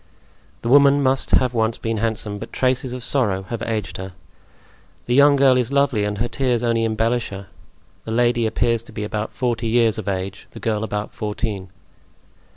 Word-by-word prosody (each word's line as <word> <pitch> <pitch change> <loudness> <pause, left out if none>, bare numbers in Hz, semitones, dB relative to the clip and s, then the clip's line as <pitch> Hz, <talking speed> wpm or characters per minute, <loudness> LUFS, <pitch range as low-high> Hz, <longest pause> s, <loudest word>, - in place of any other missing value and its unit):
The - - -2
woman 140 +1 +6
must 130 0 +1
have 125 -1 +3
once 110 -1 0
been 115 -1 -2
handsome, 105 -2 -2
but - - -8
traces 130 0 0
of 125 -1 -6
sorrow 105 -8 0
have 115 - -4
aged 110 -3 -3
her. 95 0 -7 0.9
The 120 - -1
young 140 +2 +6
girl 135 -2 +5
is 125 0 0
lovely 140 -7 +2
and 105 0 -2
her 120 - 0
tears 120 0 0
only 115 -1 +1
embellish 115 +2 0
her; 100 0 -8 0.6
the 110 - -5
lady 120 0 +2
appears 115 +1 +1
to 115 - -15
be 105 - -5
about 105 +1 -3
forty 120 -3 -1
years 115 -1 +2
of 105 - -7
age, 95 0 -4
the - - -9
girl 110 -1 -1
about 105 -1 -4
fourteen. 105 -2 -4
115 Hz, 185 wpm, -21 LUFS, 105-125 Hz, 0.9 s, woman